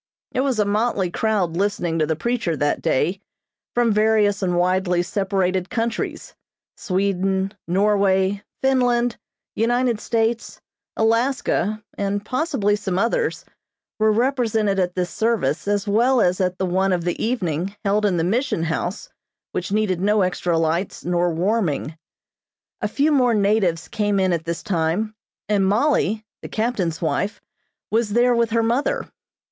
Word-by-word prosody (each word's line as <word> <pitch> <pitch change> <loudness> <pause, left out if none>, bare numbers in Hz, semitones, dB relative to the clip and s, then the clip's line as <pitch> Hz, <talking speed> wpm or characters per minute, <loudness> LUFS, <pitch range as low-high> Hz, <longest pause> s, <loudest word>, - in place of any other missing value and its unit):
It - - -2
was 265 -3 +1
a 210 - +2
motley 205 -3 0
crowd 195 -5 0
listening 175 -4 0
to 155 - +2
the 160 - 0
preacher 225 -4 -1
that 145 0 0
day, 180 +9 0 0.5
from 240 -2 +3
various 210 -1 +3
and 180 -2 0
widely 180 0 +2
separated 190 -1 -1
countries, 230 0 -3 0.4
Sweden, 190 0 0
Norway, 195 +1 +2 0.2
Finland, 245 -3 +2 0.3
United 240 0 +1
States, 230 0 -1 0.4
Alaska 225 -2 +1 0.2
and 200 +1 -1
possibly 255 -6 0
some 195 -3 -3
others, 235 - 0 0.5
were 215 0 +4
represented 225 -4 +1
at 180 -1 0
this 180 -2 -1
service 225 +2 0
as 205 0 0
well 240 +5 +3
as 180 -3 +2
at 180 0 0
the 190 - -1
one 190 +1 +1
of 175 -2 -1
the 175 0 -2
evening 195 -5 -1
held 205 +2 +2
in 195 -4 +2
the 165 - +1
Mission 220 -1 0
House 170 +4 -3 0.4
which 180 - -3
needed 200 -4 0
no 205 0 +3
extra 175 -2 0
lights 165 +4 -1
nor 175 0 +1
warming. 170 -4 -1 0.9
A 210 - +1
few 285 +8 +1
more 250 -5 +3
natives 200 -5 +1
came 205 -2 0
in 185 -2 +2
at 165 -1 -2
this 170 0 -4
time, 185 +3 -1 0.3
and 205 -2 +2
Mollie, 215 0 +1 0.2
the - - -8
captain's 205 -8 -1
wife, 200 +5 -1 0.5
was 220 -2 +1
there 245 +2 +4
with 235 -1 +2
her 230 0 +1
mother. 280 - 0
205 Hz, 145 wpm, -22 LUFS, 180-225 Hz, 0.9 s, were